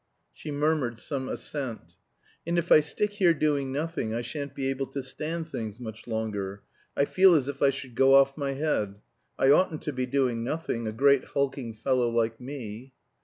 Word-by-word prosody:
She 155 - -9
murmured 145 -5 0
some 130 +1 -4
assent. 130 -7 -5 0.5
"And 170 +1 +1
if 170 0 -1
I - - +10
stick 205 +7 -1
here 185 -5 +3
doing 145 -3 0
nothing 145 -6 -2
I 120 - -1
shan't 140 +3 -5
be 135 -1 -2
able 135 0 -3
to 135 +1 -5
stand 160 +5 -4
things 110 -5 -5
much 110 -2 -8
longer; 105 -3 -3 0.3
I 140 - +4
feel 185 +2 +5
as 140 -4 +2
if 140 -1 -5
I 140 - +6
should 135 -2 -6
go 135 +3 +5
off 135 0 +5
my 140 -2 -2
head. 135 -9 -1 0.4
I 135 - +5
oughtn't 155 0 +3
to 150 - -3
be 130 0 -2
doing 125 -3 +1
nothing, 120 -4 -2
a - - -1
great 140 +3 +4
hulking 135 -4 -2
fellow 125 +1 +1
like 115 0 0
me." 125 -2 -7
135 Hz, 190 wpm, -27 LUFS, 120-150 Hz, 0.5 s, I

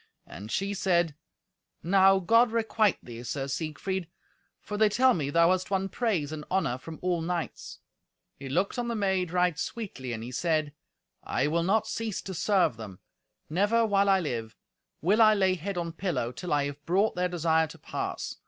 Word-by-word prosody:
And 105 +3 -9
she 195 +1 -1
said, 175 -5 +1 0.7
"Now, 195 +2 +5
God 230 +6 +4
requite 220 -3 +2
thee, 120 -1 -9
Sir 135 +3 -4
Siegfried, 165 +5 -3 0.5
for 210 - -6
they 215 0 +4
tell 255 +4 +4
me 145 -8 -2
thou 170 +3 +4
hast 185 0 0
won 195 0 0
praise 190 - -1
and 155 -1 -6
honour 135 -10 0
from 160 +4 -9
all 180 -2 0
knights." 170 0 -4 0.6
He 135 -1 -8
looked 185 - 0
on 240 - -2
the 235 - -2
maid 190 -4 0
right 180 -3 +1
sweetly, 180 - -5
and 115 -1 -4
he 120 - -7
said, 155 0 0 0.5
"I - - 0
will 165 +3 +1
not 200 +5 +2
cease 225 -3 -3
to 190 - -6
serve 185 - +2
them. 105 -5 -9 0.5
Never, 205 +8 +2
while 200 -2 +2
I 195 -1 +5
live, 115 - -4 0.5
will 200 +8 +3
I 215 -1 +7
lay 190 -2 +3
head 185 +2 -4
on 170 -1 -2
pillow, 160 -9 -2
till 175 +8 -7
I 145 -1 +2
have 145 +1 -7
brought 195 +5 +2
their 180 0 0
desire 160 -2 +2
to - - -12
pass. - - -5
180 Hz, 185 wpm, -28 LUFS, 150-200 Hz, 0.7 s, I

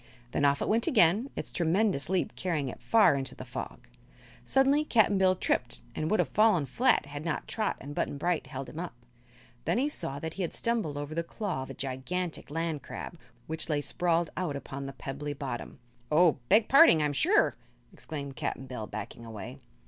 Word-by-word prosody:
Then 145 - +1
off 140 0 +3
it - - -3
went 230 +2 +3
again, 220 - +4
its - - -4
tremendous 175 -2 +1
leap 185 -1 0
carrying 155 -7 -1
it - - -9
far 225 -8 +5
into 135 -1 -3
the - - -8
fog. - - -7 0.6
Suddenly 275 +3 +3
Cap'n 220 -8 +3
Bill 185 -1 +4
tripped 125 -9 0
and 155 - -2
would 215 - +2
have - - +3
fallen 210 -8 +3
flat 245 - +2
had 145 +1 -7
not 165 -2 -3
Trot 215 -2 -1
and 145 +2 -8
Button 145 - -2
Bright 175 +2 -1
held 135 -2 -6
him 155 - -8
up. 175 -7 -5 0.7
Then - - +1
he 275 +4 +2
saw 140 - -2
that 160 +2 -5
he 195 - -5
had 175 - -2
stumbled 220 -11 -1
over 145 +1 -5
the 170 - 0
claw 180 -3 -4
of 130 - -7
a - - -7
gigantic 150 +7 -3
land 160 -1 -2
crab, 170 - -8 0.3
which 160 +1 -4
lay 150 -2 +1
sprawled 165 +3 0
out 175 -6 -2
upon 140 0 -6
the 135 - -6
pebbly 145 +2 -5
bottom. 135 -4 -6 0.3
"Oh; 160 -1 +5
beg 215 +2 +5
parding, 275 - +7
I'm 145 -1 0
sure!" 395 - +3 0.4
exclaimed 140 -3 -7
Cap'n 135 - -3
Bill 125 -4 -6
backing 110 +2 -7
away. 110 -2 -8
160 Hz, 195 wpm, -29 LUFS, 140-195 Hz, 0.7 s, parding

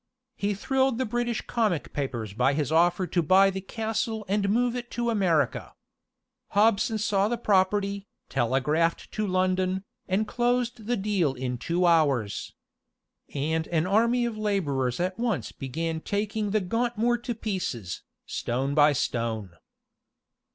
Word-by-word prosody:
He 205 0 -1
thrilled 265 +3 +1
the 260 - 0
British 240 +1 -2
comic 215 -9 -1
papers 120 -7 -3
by 125 +6 +2
his 150 0 -1
offer 175 +3 +3
to 175 0 0
buy 190 +4 +5
the 190 0 -4
castle 220 +1 -3
and 200 +1 +1
move 240 +3 +2
it 240 -1 -5
to 235 0 +1
America. 170 - +1 0.8
Hobson 220 +1 +3
saw 205 -1 +1
the 240 +2 -1
property, 200 -1 +1 0.2
telegraphed 135 +7 0
to 215 -1 -2
London, 185 0 +1 0.2
and 200 +3 +1
closed 240 -1 0
the 245 - +1
deal 190 -8 0
in 125 -1 -3
two 175 +6 0
hours. 140 -11 +2 0.8
And 160 +3 -1
an 165 -1 +1
army 235 +5 +3
of 225 -2 -4
laborers 145 - 0
at 185 +3 -2
once 220 - -1
began 160 +5 -3
taking 210 +2 -2
the 210 +1 +1
Gauntmoor 235 +4 0
to 240 -1 -3
pieces, 180 - -3 0.2
stone 135 +4 -2
by 150 0 +5
stone. 115 -6 -2
190 Hz, 140 wpm, -27 LUFS, 150-220 Hz, 0.8 s, buy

